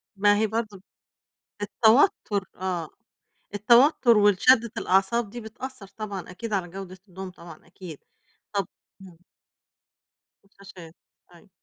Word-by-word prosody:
ما 205 +1 +3
هي 220 - +1
برضه 220 -1 -4
ب 185 - -20 0.8
التوتُّر 220 - +2
آه. 180 -4 -4 0.7
التوتُّر 235 +2 +4
والشدِّة 210 +3 +4
الأعصاب 195 +4 +1
دي 240 +3 -8
بتأثّر 225 -1 -9
طبعًا 200 -2 -7
أكيد 215 +3 -7
على 185 -3 -1
جودة 190 0 -9
النوم 185 +1 -8
طبعًا 170 -3 -14
أكيد. 170 -3 -11 0.5
طُب 200 -3 -1 0.3
إمم. 185 -3 -14 1.3
الشاشات 195 -4 -15 0.4
أيوه. 175 +4 -20
200 Hz, 115 wpm, -25 LUFS, 185-220 Hz, 1.3 s, التوتُّر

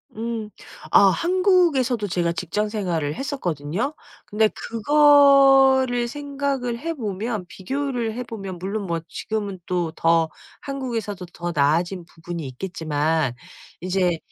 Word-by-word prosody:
음. 225 -1 -4 0.4
아 - - +7
한국에서도 335 - +2
제가 175 -2 0
직장 185 +5 -2
생활을 175 -9 -2
했었거든요? 215 - -3 0.3
근데 215 +1 +2
그거를 270 -1 +5
생각을 275 -3 -3
해 330 +4 -3
보면 215 -3 -3
비교를 245 +2 -3
해 250 - -3
보면 195 -6 -7
물론 200 +2 -3
뭐 165 -1 -2
지금은 205 -4 -4
또 175 -2 0
더 165 -1 +2 0.3
한국에서도 230 -8 -4
더 175 0 -4
나아진 170 +5 +1
부분이 165 -2 -7
있겠지만 155 -2 -1 0.5
이제 180 -2 +1
210 Hz, 260 characters per minute, -23 LUFS, 175-265 Hz, 0.5 s, 아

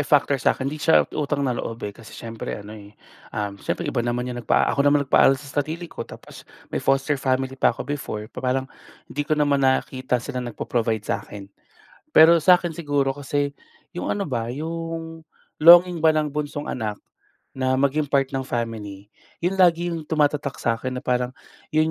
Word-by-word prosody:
factor 140 -2 +2
sa - - +2
akin, 130 - -5
hindi 150 +3 -3
siya 160 0 +5
utang 145 -1 -1
na 130 - +1
loob, 115 -2 -5
eh, 100 - -4
kasi 115 +1 -13
siyempre 115 -1 -6
ano, 105 +1 -10
eh, 105 -1 -13 0.4
um, 105 -1 -2
siyempre 175 - -3
iba 140 -4 -1
naman 120 +1 -1
'yong 120 -1 -5
nagpa 115 - +3
ako 140 - 0
naman 145 0 +4
nagpaaral 135 +1 +5
sa 145 +1 -3
sarili 160 +4 -5
ko - - -9
tapos - - -12 0.3
may - - -1
foster 135 +1 +1
family 130 0 0
pa 135 - +2
ako - - -3
before. 140 -7 -4
Pa - - -7
parang 130 +1 0 0.5
hindi 145 - -3
ko 155 - +2
naman 145 -2 +2
nakita 130 -1 +1
sila 130 -3 -4
nagpo-provide 115 -2 -2
sa'kin. 100 -1 -5 0.6
Pero 165 +2 +8
sa'kin 175 +1 +4
siguro 145 -4 0
kasi 145 +1 -2 0.5
'yong - - -1
ano 205 - -2
ba 115 -2 -1
'yong 165 +3 -5 0.3
longing 175 +2 +8
ba 160 0 +4
ng 150 -1 0
bunsong 145 0 -4
anak 110 -4 -3 0.6
na 130 0 +1
maging 140 +2 +1
part 135 -1 +2
ng 135 -1 -3
family. 105 -4 -5 0.3
'Yon 190 +2 0
lagi 175 -1 +4
'yong 160 -2 -5
tumatatak 145 -3 0
sa 115 - +2
akin 130 0 -4
na - - -8
parang 125 0 0 0.4
'yon 155 +1 +3
140 Hz, 185 wpm, -23 LUFS, 125-155 Hz, 0.6 s, Pero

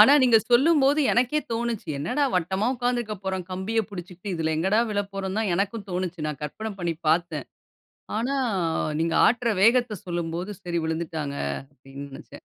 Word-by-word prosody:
ஆனா, 225 +7 +9
நீங்க 245 -3 +6
சொல்லும்போது 285 +3 +5
எனக்கே 255 +5 +2
தோனுச்சு. 230 -4 -2
என்னடா! 230 - 0
வட்டமா 190 +4 +1
உட்கார்ந்திருக்கப் 240 -5 -2
போறோம். 190 -2 -2
கம்பியைப் 215 +4 -1
பிடிச்சுக்கிட்டு, 180 +1 -7
இதில 160 -1 0
எங்கடா 190 +7 +2
விழப்போறோம்ன்னு 200 0 -2
தான் 215 - 0
எனக்கும் 200 +2 -2
தோனுச்சு. 180 -3 -2
நான் 150 - -5
கற்பனை 220 +9 -4
பண்ணி 170 -1 -1
பாத்தேன். 165 -3 +1 0.7
ஆனா, 265 +5 0 0.6
நீங்க 165 0 +1
ஆட்டுற 235 0 +2
வேகத்த 235 -2 +4
சொல்லும்போது, 175 +2 -3
சரி, 170 -2 -1
விழுந்துட்டாங்க. 160 -3 -3 0.4
அப்பிடீன்னு 140 +1 -10
நினைச்சேன். - - -12
190 Hz, 145 wpm, -25 LUFS, 170-230 Hz, 0.7 s, ஆனா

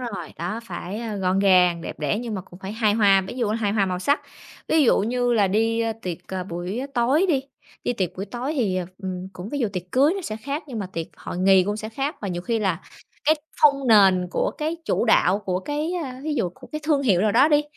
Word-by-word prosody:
rồi. 200 -9 -6
Đó, 180 +8 -3
phải 190 +1 -6 0.2
gọn 185 +1 +1
gàng, 180 -3 +4
đẹp - - -7
đẽ 150 +7 0
nhưng 230 -3 -4
mà 190 - -3
cũng 180 -1 -15
phải 195 +2 -6
hài 215 -2 +2
hòa, 200 -3 +5
ví - - -6
dụ, 235 -4 0
hài 210 -2 0
hòa 200 -3 +2
màu 180 -1 -2
sắc. 285 +10 +1 0.5
Ví 315 -1 +4
dụ - - +4
như 245 +3 0
là 205 -4 +3
đi 225 +3 +1 0.2
tiệc, 180 -2 -4
à, 185 -1 -3
buổi 180 +6 -4
tối 265 +10 +3
đi, 285 -6 +3 0.4
đi 245 - +1
tiệc 185 -6 -3
buổi 195 - -3
tối 250 +6 -4
thì, 205 -9 0 0.2
ừm, 185 0 -4
cũng 185 +3 -8
ví 285 - -3
dụ 230 -5 +1
tiệc 180 -2 -3
cưới 280 +6 +4
nó 395 - -3
sẽ 215 -8 -4
khác 280 +8 -4
nhưng 250 -6 -6
mà 200 - -3
tiệc 165 -1 -3
hội - - -6
nghị 190 0 +5
cũng 205 +2 -2
sẽ 215 0 -5
khác. 275 +7 -3
Và 205 - -3
nhiều 175 -1 -3
khi 230 +1 0
là 190 -4 0 0.4
cái 310 +2 +5 0.3
phông 280 -3 +5
nền 190 -4 +6
của - - 0
cái 315 +2 -1
chủ - - +1
đạo 200 -4 +4
của 185 -3 -2
cái, 300 - -2
ờ, 260 - -5
thí 305 -1 -2
dụ 210 -9 0
của - - -14
cái 305 - -3
thương 295 -3 +2
hiệu 195 -9 +3
nào 210 0 +2
đó 270 +6 +5
đi 295 -1 +4
215 Hz, 250 wpm, -23 LUFS, 185-255 Hz, 0.5 s, nền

